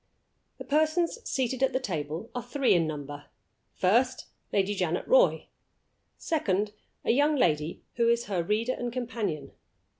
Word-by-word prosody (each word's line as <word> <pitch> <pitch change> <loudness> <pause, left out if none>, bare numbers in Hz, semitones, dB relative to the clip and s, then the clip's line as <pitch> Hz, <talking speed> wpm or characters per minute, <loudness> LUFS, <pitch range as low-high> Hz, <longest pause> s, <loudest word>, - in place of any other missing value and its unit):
The - - -7
persons 315 +7 +1
seated 260 -1 -1
at 265 0 +2
the 260 - +1
table 165 - -4
are 245 - -3
three 255 +2 +2
in 165 -2 +3
number. 145 -1 -6 0.5
First, 240 +8 +2 0.3
Lady 200 0 +1
Janet 180 -3 -1
Roy. - - +4 0.7
Second, 210 - 0 0.3
a - - +4
young 290 +5 +3
lady 155 - +1
who 235 -1 +3
is 235 0 +2
her 190 -4 -1
reader 215 +8 0
and 245 -1 -4
companion. 230 - -3
230 Hz, 145 wpm, -28 LUFS, 175-260 Hz, 0.7 s, Roy